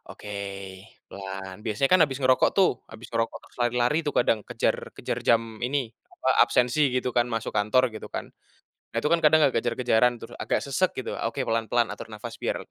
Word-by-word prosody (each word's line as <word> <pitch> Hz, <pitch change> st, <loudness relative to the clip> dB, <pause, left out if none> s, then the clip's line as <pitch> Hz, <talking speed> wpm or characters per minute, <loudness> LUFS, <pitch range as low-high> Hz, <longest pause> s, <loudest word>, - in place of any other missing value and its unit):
oke, 105 Hz, -1 st, -8 dB, 0.7 s
pelan 95 Hz, -1 st, -7 dB
biasanya 115 Hz, +5 st, +1 dB
kan 185 Hz, -, +6 dB
habis 135 Hz, -1 st, -5 dB
ngerokok 130 Hz, 0 st, +4 dB
tuh, 195 Hz, -, +5 dB, 0.2 s
habis 115 Hz, +1 st, -11 dB
ngerokok 115 Hz, 0 st, -1 dB
terus -, -, -24 dB
lari-lari 125 Hz, +5 st, +2 dB
tuh 145 Hz, -, -1 dB
kadang 115 Hz, -3 st, +2 dB
kejar -, -, +1 dB, 0.2 s
kejar -, -, -3 dB
jam 115 Hz, 0 st, +5 dB, 0.2 s
ini, 130 Hz, -4 st, -1 dB, 0.2 s
apa -, -, -3 dB, 0.2 s
absensi 125 Hz, +4 st, +1 dB
gitu 125 Hz, 0 st, 0 dB
kan 120 Hz, 0 st, +4 dB
masuk 115 Hz, -1 st, -2 dB
kantor 120 Hz, +5 st, +3 dB
gitu 110 Hz, -, -7 dB
kan. -, -, -5 dB, 0.6 s
Nah 115 Hz, -, -1 dB
itu -, -, +1 dB
kan 170 Hz, -, +3 dB
kadang 155 Hz, +1 st, +6 dB
kayak -, -, -7 dB
kejar-kejaran 120 Hz, 0 st, +2 dB
terus 115 Hz, +1 st, -10 dB
agak -, -, 0 dB
sesak 160 Hz, +7 st, +1 dB
gitu, 130 Hz, -, -4 dB
oke 115 Hz, 0 st, -3 dB
pelan-pelan 115 Hz, +1 st, +1 dB
atur -, -, -8 dB
nafas 115 Hz, +2 st, -7 dB
biar -, -, 0 dB
120 Hz, 190 wpm, -26 LUFS, 115-130 Hz, 0.7 s, kan